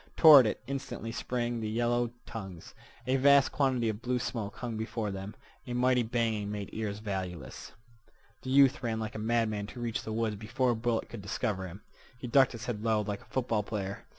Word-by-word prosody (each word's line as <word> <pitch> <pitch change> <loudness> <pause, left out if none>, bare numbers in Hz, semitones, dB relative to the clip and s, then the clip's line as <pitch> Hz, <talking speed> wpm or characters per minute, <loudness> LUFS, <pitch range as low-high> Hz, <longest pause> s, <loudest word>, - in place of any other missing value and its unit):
Toward 145 -7 +9
it 110 - -3
instantly 130 -3 -5
sprang 120 0 -2
the 110 - -2
yellow 120 +1 +1 0.2
tongues. 95 -8 -8 0.3
A 130 +2 +2
vast 140 0 +5
quantity 130 -5 +1
of 110 0 -2
blue 125 +1 0
smoke 110 -5 -4
hung 120 -2 -5
before 110 -1 -3
them. 95 +2 -6 0.3
A 125 - -4
mighty 125 0 +3
banging 110 -3 -1
made 105 -2 -5
ears 105 -2 -3
valueless. 95 -5 -6 0.7
The 130 - -6
youth 135 +1 +5
ran 115 -2 -2
like 110 0 -4
a - - -5
madman 110 -2 0
to 120 - -10
reach 120 -2 -2
the 110 - -6
woods 110 -1 -1
before 115 +4 0
a - - 0
bullet 115 0 -1
could 115 - -8
discover 95 -1 -2
him. 95 +4 -11 0.3
He 125 - -8
ducked 135 +1 +4
his 115 -2 -7
head 110 -3 -4
low, 110 -2 +2
like 105 -1 -4
a - - -18
football 120 -4 -1
player. 100 -2 -5
115 Hz, 200 wpm, -30 LUFS, 105-125 Hz, 0.7 s, Toward